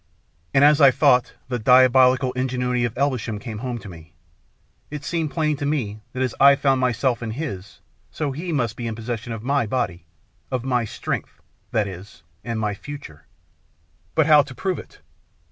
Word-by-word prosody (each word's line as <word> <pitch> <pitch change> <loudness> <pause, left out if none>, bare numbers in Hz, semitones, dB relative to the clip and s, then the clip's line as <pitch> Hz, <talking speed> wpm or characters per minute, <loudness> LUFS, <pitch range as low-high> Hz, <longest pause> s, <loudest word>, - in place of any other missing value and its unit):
And 135 - +4
as 150 +1 +6
I 140 - +9
thought, 125 -1 +3
the 125 -1 -2
diabolical 130 +2 +5
ingenuity 125 -1 -1
of 120 0 -5
Elvesham 125 -5 -1
came 110 -1 -7
home 125 0 -4
to 105 - -10
me. 85 -2 -12 0.8
It 150 -1 -6
seemed 165 0 -1
plain 155 -1 0
to 145 - -3
me 110 -8 -2
that 130 +1 -1
as 130 - -1
I 140 0 +8
found 135 -2 +1
myself 125 0 +1
in 115 - -4
his, 110 -7 -6 0.3
so 150 -3 -3
he 165 +6 -5
must 120 -7 -1
be 120 -1 -5
in 115 - -4
possession 115 +1 -5
of 110 -1 -6
my 140 -2 +1
body, 95 -8 -2 0.4
of 130 -2 -2
my 125 -3 +1
strength, - - -5 0.3
that 105 -2 0
is, 95 -2 -10 0.2
and 115 -2 -3
my 105 -1 -1
future. 135 - -10 0.9
But 160 - +4
how 150 -1 +7
to 140 -2 -8
prove 185 +7 -2
it? - - -14
125 Hz, 180 wpm, -22 LUFS, 115-140 Hz, 0.9 s, I